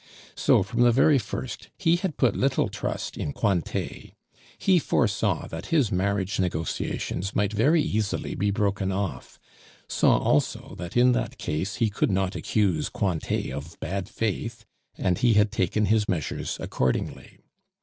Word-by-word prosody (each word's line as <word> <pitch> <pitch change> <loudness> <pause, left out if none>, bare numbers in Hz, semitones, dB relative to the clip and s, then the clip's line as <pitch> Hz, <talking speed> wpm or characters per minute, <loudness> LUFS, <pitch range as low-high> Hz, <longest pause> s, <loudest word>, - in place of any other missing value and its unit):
So, - - +3
from 115 +5 -2
the 120 0 +6
very 135 +4 +5
first, 120 +4 -6
he 170 -3 +3
had 180 -4 -3
put 120 -6 +3
little 135 0 +1
trust - - -4
in 70 - -3
Cointet. 95 -7 -2 0.4
He 185 -2 +4
foresaw 115 -8 +1
that 80 0 -6
his 145 -9 +2
marriage 95 +1 0
negotiations 90 +2 -2
might 105 0 +1
very 150 +9 +3
easily 110 -9 -1
be 100 - 0
broken 100 -1 0
off, 95 -1 -4 0.5
saw - - +3
also - - 0
that 90 +5 -4
in 125 +1 +6
that 125 - -1
case 95 +7 -2
he 115 -3 +1
could 100 - +1
not 95 0 0
accuse 95 -8 0
Cointet 90 -9 -1
of 70 +5 -7
bad 95 0 -3
faith, 115 +1 -3 0.3
and 90 -2 0
he 120 -3 +4
had 105 0 +4
taken 95 +4 +1
his 105 0 +2
measures 80 -6 -2
accordingly. 65 0 -2
100 Hz, 150 wpm, -26 LUFS, 95-120 Hz, 0.5 s, the